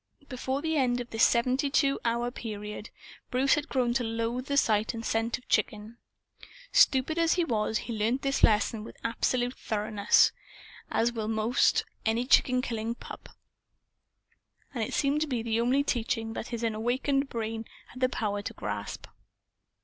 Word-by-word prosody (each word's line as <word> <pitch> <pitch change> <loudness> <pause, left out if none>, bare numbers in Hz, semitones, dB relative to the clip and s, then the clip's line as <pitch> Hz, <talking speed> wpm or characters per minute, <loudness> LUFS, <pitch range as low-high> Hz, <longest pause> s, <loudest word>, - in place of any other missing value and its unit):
Before 265 +2 -3
the 320 -1 0
end 245 -3 +2
of 245 -1 -6
this 225 0 +1
seventy 255 +4 +3
two 275 0 +2
hour 235 +1 0
period, 210 -2 -6 0.4
Bruce 260 +2 +3
had 295 +1 -1
grown 245 -3 +1
to 250 0 0
loathe 230 +3 -2
the 280 - 0
sight 215 -3 +2
and 225 0 -6
scent 225 +2 0
of 250 - -20
chicken. 220 +1 -1 0.7
Stupid 315 - +4
as 330 -1 +3
he 355 - +1
was, 220 -6 0
he 230 +4 -5
learned 225 +5 0
this 275 0 0
lesson 215 0 +3
with - - -11
absolute 245 +2 0
thoroughness, 210 -2 +2 0.6
as 235 +1 +1
will 220 -2 -3
almost 225 +3 +2 0.2
any 225 +2 +1
chicken 255 -1 +4
killing 230 -1 -3
pup, - - -10 1.4
and 235 -4 -1
it - - -3
seemed 285 +2 +1
to 310 - +1
be 245 -5 -2
the 230 0 0
only 260 +4 +2
teaching 225 -3 -1
that - - -5
his 235 -1 -5
unawakened 240 +5 0
young - - -21
brain 225 -2 -4 0.2
had 255 - -11
the 255 0 +2
power 205 -4 -2
to - - -6
grasp. - - -5
235 Hz, 170 wpm, -28 LUFS, 225-260 Hz, 1.4 s, Stupid